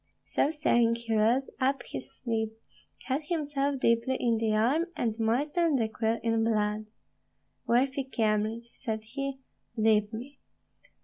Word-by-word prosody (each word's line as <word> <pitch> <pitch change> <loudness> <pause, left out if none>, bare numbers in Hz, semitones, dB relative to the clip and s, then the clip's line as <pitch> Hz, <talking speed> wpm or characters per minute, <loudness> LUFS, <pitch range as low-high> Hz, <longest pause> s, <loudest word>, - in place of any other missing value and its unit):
So - - +1
saying, 240 -7 +3
he 235 -1 -3
rolled 230 +5 +2
up 265 -1 +1
his 130 0 -6
sleeve, 220 -3 -2 0.5
cut 270 +3 0
himself 285 -4 0
deeply 235 +2 +2
in 230 -2 +2
the 220 -1 +1
arm, 250 +10 +3
and 230 -3 0
moistened 290 +7 +2
the 225 - +1
quill 225 +1 0
in 225 -1 +2
blood. 215 -1 0 0.8
"Worthy 265 +3 +2
Kyemlich," 225 -1 -1
said 220 -4 -4
he, 270 +4 -5 0.4
"leave 215 -1 +3
me." 255 +5 -8
235 Hz, 135 wpm, -29 LUFS, 220-270 Hz, 0.8 s, saying